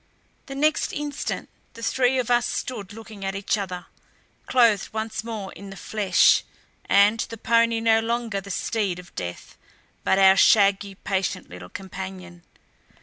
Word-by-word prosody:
The 275 - -7
next 305 +3 +1
instant 295 -1 -4 0.3
the 230 - -10
three 260 +2 +2
of 245 -2 -1
us 240 0 +3
stood 210 -7 -4
looking 215 -2 -10
at 195 0 -2
each 195 +2 0
other, 185 -3 -5 0.6
clothed 230 -5 +3
once 220 0 -4
more 220 -4 -6
in 200 - -10
the 195 - -9
flesh, 200 -2 +3 0.4
and 205 +3 +4
the 230 0 -4
pony 230 +1 +2
no 225 -1 +4
longer 225 -3 -2
the 200 - -11
steed 200 -2 -1
of 180 0 -12
death, 85 0 -7 0.4
but - - +2
our 190 0 +6
shaggy, 200 -2 +4
patient 190 - -3
little 90 0 -10
companion. 185 - -8
205 Hz, 150 wpm, -24 LUFS, 195-230 Hz, 0.6 s, our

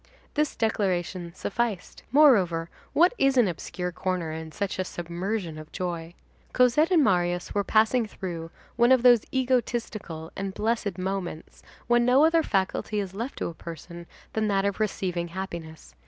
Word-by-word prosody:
This 300 -1 0
declaration 185 -5 -1
sufficed. 215 -2 -3
Moreover, 190 - +4 0.2
what 350 +6 +5
is 270 -1 +3
an 240 -4 +5
obscure 180 +1 -4
corner 180 -2 -2
in 160 0 -6
such 200 +2 -3
a - - +2
submersion 175 0 -4
of 155 0 -11
joy? 175 -1 -4 0.4
Cosette 255 +6 +4
and 340 -5 +5
Marius 175 -4 +1
were 205 - +1
passing 220 +3 +3
through 170 -5 -6 0.3
one 240 +1 +5
of 260 -2 +5
those 245 -3 +7
egotistical 235 -10 -1
and 195 0 -4
blessed 220 -2 -1
moments 185 -3 -4 0.2
when 240 0 +3
no 255 +5 +5
other 330 0 +4
faculty 205 -2 -1
is 195 -2 -4
left 230 +7 -5
to - - -2
a 170 - -6
person 170 +1 -9 0.3
than 220 -1 0
that 195 -1 +1
of 200 +1 -1
receiving 185 -5 -1
happiness. 170 - -7
195 Hz, 155 wpm, -26 LUFS, 175-235 Hz, 0.4 s, those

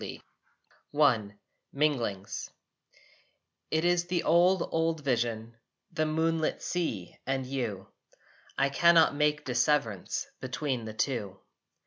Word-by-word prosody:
I 120 -9 +4 0.4
MINGLINGS 120 -10 -1 1.2
It 160 +2 +1
is 175 0 +2
the 175 -1 -1
old 175 +2 +4
old 165 -1 0
vision, 115 -3 -1 0.3
The 155 0 0
moonlit 160 0 0
sea 115 - -3
and 135 -1 -1
you. 115 -8 -4 0.7
I 135 0 +3
cannot 165 +3 +5
make 150 0 +1
disseverance 125 -5 0
Between 130 -2 -3
the 110 -1 -7
two. 105 -7 -2
140 Hz, 100 wpm, -29 LUFS, 115-160 Hz, 1.2 s, cannot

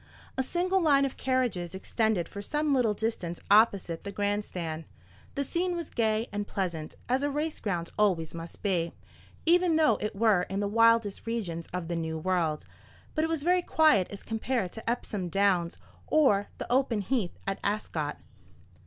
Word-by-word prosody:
A 265 - +1
single 365 +7 +1
line 280 -4 +4
of 270 - -4
carriages 240 -9 -1
extended 205 -2 0
for 200 - -7
some 295 +6 0
little 235 -5 +2
distance 200 -6 -3
opposite 200 -6 +4
the 200 - -5
grand 205 +1 0
stand. 160 -2 -5 0.5
The 280 - 0
scene 350 +5 -1
was 340 -3 -5
gay 220 0 +1
and 205 0 -3
pleasant, 170 -5 -3
as 255 +2 +1
a 290 - +1
race 300 +2 -2
ground 175 -5 -2
always 180 -6 +2
must 165 0 -8
be, 175 -5 0 0.5
even 345 0 +4
though 315 -1 +4
it 210 -1 -3
were 200 -4 +3
in 195 +1 -2
the 205 - 0
wildest 230 -1 +3
regions 180 -8 -3
of 180 -2 -4
the 170 - -2
New 160 -1 -2
World; 165 -3 0 0.5
but 310 - +1
it 320 - 0
was 325 -3 -1
very 360 +2 +3
quiet 310 - +4
as 200 - -8
compared 225 -3 -1
to 225 0 -5
Epsom 210 -6 -2
Downs 180 -2 +2 0.3
or 210 -10 +4
the - - -4
open 250 -4 +2
heath 200 -3 -1
at 195 0 -2
Ascot. 165 -8 -2
210 Hz, 175 wpm, -29 LUFS, 180-265 Hz, 0.5 s, line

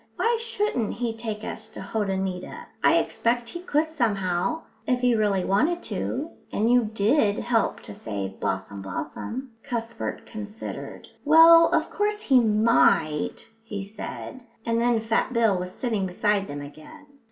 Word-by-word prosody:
"Why 470 +1 +2
shouldn't 420 - -1
he 235 -2 -2
take 220 -2 -5
us 220 -1 -6
to - - -11
Hotoneeta? 190 -2 -3 0.2
I - - +6
expect 235 0 0
he 345 - -6
could 315 -2 0
somehow, 205 - 0 0.2
if 250 -1 +2
he 250 -1 +4
really 205 -4 +1
wanted 315 - +1
to; 300 +6 -3 0.2
and 225 +3 +1
you 245 -2 +4
did 215 +1 +2
help 235 -2 0
to 105 - -9
save 100 -3 -5
Blossom 95 +1 -3
blossom." 230 - -5
Cuthbert 230 -3 -4
considered. 215 0 -7 0.2
"Well, 330 +2 +8
of 320 0 +1
course 420 0 -1
he 265 -2 +5
might," 210 - +2
he 205 -3 -5
said, 215 +5 -7 0.2
and 230 0 +1
then 240 -1 +3
Fat 225 +3 0
Bill 225 -4 +3
was 180 0 -5
sitting 215 -3 -2
beside 200 +2 0
them 145 0 -6
again. 155 - -12
225 Hz, 150 wpm, -25 LUFS, 195-255 Hz, 0.2 s, Well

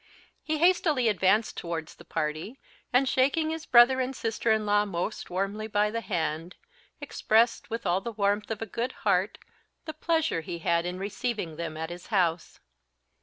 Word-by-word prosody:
He 310 0 -2
hastily 315 -6 +3
advanced 205 +2 +2
towards 165 -2 -4
the - - -15
party, 160 - -3 0.3
and 260 +2 +3
shaking 285 +5 +2
his 320 -1 -5
brother 255 +2 +6
and 260 +1 -3
sister 225 0 -1
in 220 -1 +2
law 205 0 +3
most 180 -4 -4
warmly 195 +4 -2
by 210 0 +1
the 230 +1 -2
hand, 165 -3 -3 0.4
expressed, 230 +2 +1
with 230 -1 -4
all 180 +1 +1
the 235 - -4
warmth 205 0 0
of 225 0 -3
a - - -4
good 235 +4 -3
heart, - - +2 0.5
the 315 - -5
pleasure 320 - 0
he 175 0 -6
had 170 +1 +1
in 180 +1 -4
receiving 205 -3 -3
them 160 -1 -5
at 160 +1 -4
his 175 0 -9
house. 175 -5 0
210 Hz, 170 wpm, -28 LUFS, 175-245 Hz, 0.5 s, brother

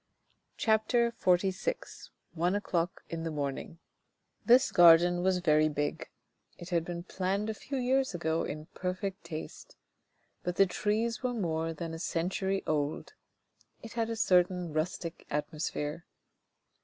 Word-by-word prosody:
CHAPTER 230 +2 +2
XLVI 190 - -1 0.2
ONE 175 +3 +1
O'CLOCK 175 -4 -1
IN 165 -1 -4
THE 165 - -2
MORNING 145 +1 -4 0.7
This 250 +2 +5
garden 175 +1 +7
was 185 0 +2
very 155 -3 +3
big, 145 0 -3 0.5
it 175 - -9
had 170 -3 +1
been 170 0 -5
planned 195 +4 -1
a - - -4
few 270 +6 -5
years 260 -3 +1
ago 165 -1 0
in 155 +1 -5
perfect 185 +2 -4
taste. 155 0 -8 0.7
But 180 0 -3
the 195 - +6
trees 215 +5 -1
were 250 -1 -1
more 165 -5 -1
than 165 +1 -5
a 165 - -6
century 190 +4 -1
old. 150 -1 -2 0.7
It 225 - -9
had 230 -1 -1
a 230 - -2
certain 180 -4 +2
rustic 165 +1 -3
atmosphere. 150 +1 -3
175 Hz, 135 wpm, -30 LUFS, 165-205 Hz, 0.7 s, garden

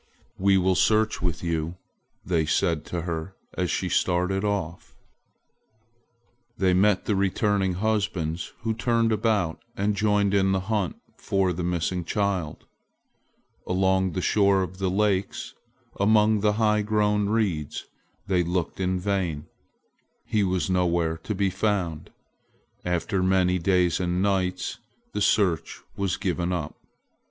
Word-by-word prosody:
"We 95 0 +4
will 95 0 +3
search 110 +3 +2
with 85 -4 -2
you," 85 0 -2 0.5
they 80 -4 +1
said 80 0 +1
to 85 -2 -4
her 85 +2 -4 0.2
as 90 -2 -1
she 95 - -1
started 90 +2 +1
off. 100 -5 -3 1.6
They 95 -1 +3
met 95 +1 +3
the 105 - +1
returning 100 0 +1
husbands, 95 -6 -1
who 115 0 -1
turned 115 0 +1
about 105 -6 0 0.2
and 100 +1 +1
joined 105 -1 +2
in 95 -1 +3
the 95 - 0
hunt 100 -2 -1 0.2
for 95 -2 0
the 90 +1 -4
missing 90 +1 -1
child. 95 -4 -2 1.0
Along 95 0 +1
the 90 - -2
shore 100 -2 +3
of 95 +1 -7
the 95 -1 0
lakes, 100 0 0 0.5
among 105 +1 +4
the 105 0 +2
high 105 -1 +2
grown 105 -1 +1
reeds, 95 -10 -1 0.4
they 95 -3 +2
looked 85 +1 -2
in 95 0 0
vain. 90 -6 -1 0.8
He 105 -2 +1
was 95 -1 0
nowhere 85 -3 +1
to 105 +6 -4
be 95 0 +1
found. 95 -5 -1 0.7
After 90 +2 -1
many 90 -1 +2
days 90 -1 +2
and 90 0 -1
nights 95 -2 -1 0.3
the 105 - -2
search 95 -6 +1 0.2
was 100 -3 -1
given 90 -3 -1
up. 80 -5 -3
95 Hz, 135 wpm, -25 LUFS, 90-105 Hz, 1.6 s, We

